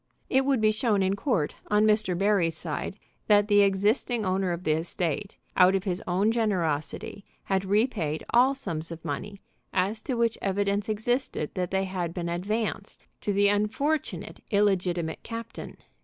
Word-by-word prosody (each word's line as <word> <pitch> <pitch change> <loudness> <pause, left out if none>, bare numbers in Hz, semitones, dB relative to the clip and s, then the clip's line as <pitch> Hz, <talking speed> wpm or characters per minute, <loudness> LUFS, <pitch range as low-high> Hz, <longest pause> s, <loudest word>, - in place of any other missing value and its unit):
It 265 0 +3
would 270 -3 +2
be 215 0 +5
shown 215 -2 +1
in 190 +1 +1
court, 200 - -1
on 210 +1 +3
Mr. 210 -4 +2
Barry's 190 -5 +2
side, 160 +3 -4 0.3
that 205 -1 +5
the 205 -1 +5
existing 210 +4 +2
owner 185 0 0
of 170 +1 -4
the 155 - +1
estate, 170 +4 -2 0.2
out 185 +1 +6
of 190 - 0
his 185 -3 -2
own 190 +5 +2
generosity, 190 -5 -1 0.2
had 195 0 0
repaid 200 - 0
all 255 +3 +5
sums 165 - -5
of 165 -1 -8
money 195 +8 -5 0.3
as 200 +4 0
to 255 - -2
which 230 -1 +1
evidence 200 +1 0
existed 220 - -1
that 180 -2 -2
they 190 0 0
had 180 -3 -3
been 170 -2 -3
advanced 200 +2 -3 0.2
to 205 - -1
the 200 0 +3
unfortunate 220 +10 -1
illegitimate 180 -5 +1
captain. 230 0 -7
200 Hz, 160 wpm, -27 LUFS, 180-215 Hz, 0.3 s, out